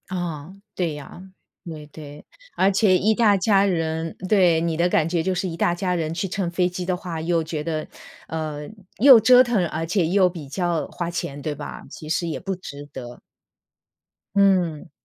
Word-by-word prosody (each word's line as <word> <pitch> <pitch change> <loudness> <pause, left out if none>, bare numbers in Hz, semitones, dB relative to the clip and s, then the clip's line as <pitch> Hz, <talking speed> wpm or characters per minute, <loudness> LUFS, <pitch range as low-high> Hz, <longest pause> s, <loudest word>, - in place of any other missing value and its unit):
啊， 175 -3 -4 0.2
对 170 -4 -1
呀， 150 +4 -10 0.4
对 155 -3 -8
对。 150 -1 -12 0.3
而 195 +1 +3
且 195 -2 +4
一 215 +4 +2
大 210 -3 +4
家 195 0 +3
人 165 -3 -2
对， 180 -5 +4
你 165 -1 -1
的 170 +2 +2
感 155 - +2
觉 170 0 0
就 190 - 0
是 185 +1 -1
一 165 - -5
大 170 +1 +1
家 180 0 -1
人 160 -2 -2
去 180 +4 -2
乘 185 -1 -2
飞 180 +1 +1
机 180 0 -5
的 180 0 0
话， 170 -3 -6
又 165 0 0
觉 155 -1 -4
得， 155 -1 -3 0.4
呃， 155 -2 -5 0.3
又 260 0 +9
折 250 +3 +7
腾 235 -7 +1
而 160 0 -3
且 175 0 +1
又 185 +1 +3
比 165 -5 -9
较 175 +1 -1
花 170 -1 -4
钱， 145 -4 -5
对 150 +1 -3
吧？ - - -8
其 155 +1 -10
实 170 +1 0
也 160 - -3
不 195 -1 -4
值 145 -5 -9
得。 125 -3 -9 1.2
嗯。 185 -6 +2
175 Hz, 205 characters per minute, -23 LUFS, 160-190 Hz, 1.2 s, 又